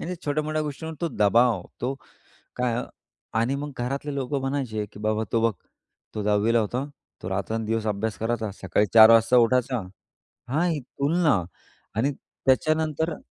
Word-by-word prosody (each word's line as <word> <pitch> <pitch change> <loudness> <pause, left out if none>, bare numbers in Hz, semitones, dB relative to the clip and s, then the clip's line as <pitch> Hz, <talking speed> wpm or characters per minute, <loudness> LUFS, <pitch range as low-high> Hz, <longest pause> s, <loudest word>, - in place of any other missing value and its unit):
आणि 180 +2 -4
छोट्या-मोठ्या 155 +1 -1
गोष्टींवर 160 +2 -5
तो 170 - 0
दबाव 110 -1 +4 0.2
तो 130 +3 -1 0.6
काय 125 -1 0 0.6
आणि 120 +4 +1
मग 145 +1 -5
घरातले 140 +4 -3
लोकं 135 +1 -2
म्हणायचे, 130 -6 -2
की - - -12
"बाबा, 110 +1 0
तो 115 - +3
बघ - - -3 0.6
तो 105 - -2
10वी 105 +2 +2
ला - - +5
होता, 120 +6 -2 0.4
तो - - -4
रात्रंदिवस 110 +3 -2
अभ्यास 105 +1 -1
करायचा 115 -1 -1
सकाळी 95 +3 +2
4:00 110 0 +10
वाजता 115 +2 +5
उठायचा" 125 +1 +3 0.7
हां, 160 +6 +1
ही 160 -3 -1
तुलना 140 - +1 0.5
आणि 130 +6 +1 0.3
त्याच्यानंतर 155 +3 +1
125 Hz, 150 wpm, -25 LUFS, 110-145 Hz, 0.7 s, 4:00